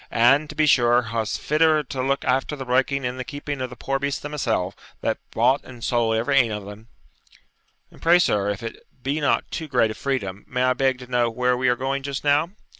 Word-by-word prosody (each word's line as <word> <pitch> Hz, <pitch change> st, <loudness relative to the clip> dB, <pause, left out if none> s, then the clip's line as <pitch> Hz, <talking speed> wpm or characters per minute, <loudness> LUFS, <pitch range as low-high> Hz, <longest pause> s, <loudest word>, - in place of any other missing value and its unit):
'And, 135 Hz, +6 st, +4 dB
to 150 Hz, -, -8 dB
be 155 Hz, 0 st, +3 dB
sure, 120 Hz, -4 st, +4 dB
wha's 110 Hz, -2 st, -1 dB
fitter 155 Hz, 0 st, +2 dB
to 130 Hz, -1 st, -5 dB
look 135 Hz, +1 st, -1 dB
after 135 Hz, +3 st, 0 dB
the 135 Hz, -2 st, -7 dB
breaking 130 Hz, +2 st, +1 dB
and 125 Hz, +1 st, -3 dB
the -, -, -2 dB
keeping 145 Hz, 0 st, -5 dB
of 130 Hz, -, -3 dB
the 125 Hz, -, -10 dB
poor 135 Hz, +2 st, -2 dB
beasts 140 Hz, 0 st, -2 dB
than 145 Hz, -, -7 dB
mysell, 110 Hz, -10 st, -1 dB, 0.3 s
that -, -, -1 dB
bought 125 Hz, +5 st, +2 dB
and 120 Hz, -3 st, -12 dB
sold 115 Hz, -2 st, +1 dB
every 120 Hz, +5 st, +1 dB
ane 120 Hz, -4 st, +4 dB
o' 105 Hz, -2 st, -5 dB
them?' 105 Hz, +2 st, -11 dB, 1.0 s
'And -, -, -18 dB
pray, 170 Hz, +2 st, +6 dB
sir, 105 Hz, -, +1 dB
if 100 Hz, +1 st, -4 dB
it 115 Hz, -, -6 dB, 0.3 s
be 140 Hz, +4 st, -1 dB
not 145 Hz, -, +1 dB
too 160 Hz, -, -4 dB
great 125 Hz, -5 st, +2 dB
a -, -, -4 dB
freedom, 105 Hz, -8 st, -3 dB
may 125 Hz, 0 st, -1 dB
I 130 Hz, 0 st, +3 dB
beg 130 Hz, 0 st, +1 dB
to 125 Hz, -, -10 dB
know 120 Hz, -1 st, +1 dB
where 125 Hz, +2 st, +1 dB
we 125 Hz, 0 st, +1 dB
are 125 Hz, -, +3 dB
going 135 Hz, +2 st, -2 dB
just 140 Hz, 0 st, -4 dB
now?' 145 Hz, +3 st, +3 dB
130 Hz, 235 wpm, -23 LUFS, 120-140 Hz, 1.0 s, pray